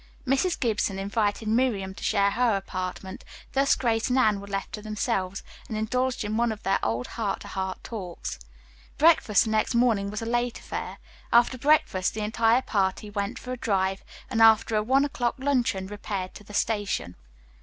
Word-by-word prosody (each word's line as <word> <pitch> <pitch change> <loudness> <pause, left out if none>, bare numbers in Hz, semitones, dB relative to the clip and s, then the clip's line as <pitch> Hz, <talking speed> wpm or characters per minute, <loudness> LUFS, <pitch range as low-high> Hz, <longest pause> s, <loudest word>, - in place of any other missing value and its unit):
Mrs. 275 +7 +1
Gibson 210 -4 0
invited 205 +2 -1
Miriam 215 -5 +1
to - - -11
share 200 -2 +2
her 235 -2 +2
apartment, 190 0 -5 0.3
thus 275 +1 +3
Grace 225 -2 0
and 250 - +2
Anne 215 -6 +3
were 200 - -10
left 195 0 -4
to 210 - -6
themselves, 205 -3 -2 0.3
and 220 - -3
indulged 250 +3 -1
in 210 +1 -2
one 235 0 +2
of 215 - -7
their 195 - +2
old 115 +3 -1
heart 210 -4 -3
to - - -9
heart 190 -1 -4
talks. 185 - -6 0.6
Breakfast 300 -9 +5
the 220 - -3
next 220 +3 +1
morning 225 -5 +2
was 215 +2 -4
a - - -4
late 240 +1 0
affair. - - -6 0.3
After 240 +2 +5
breakfast, 255 -10 +2
the 220 - -3
entire 225 +3 +2
party 200 0 -1
went 200 +2 -3
for 250 - -7
a 255 - -3
drive, 195 -4 0 0.2
and 230 -3 0
after 225 0 +6
a 210 - +3
one 265 +6 +3
o'clock 245 -4 -1
luncheon 255 -8 0
repaired 200 -2 -5
to - - -11
the 205 0 -10
station. 205 - -1
215 Hz, 185 wpm, -26 LUFS, 195-240 Hz, 0.6 s, after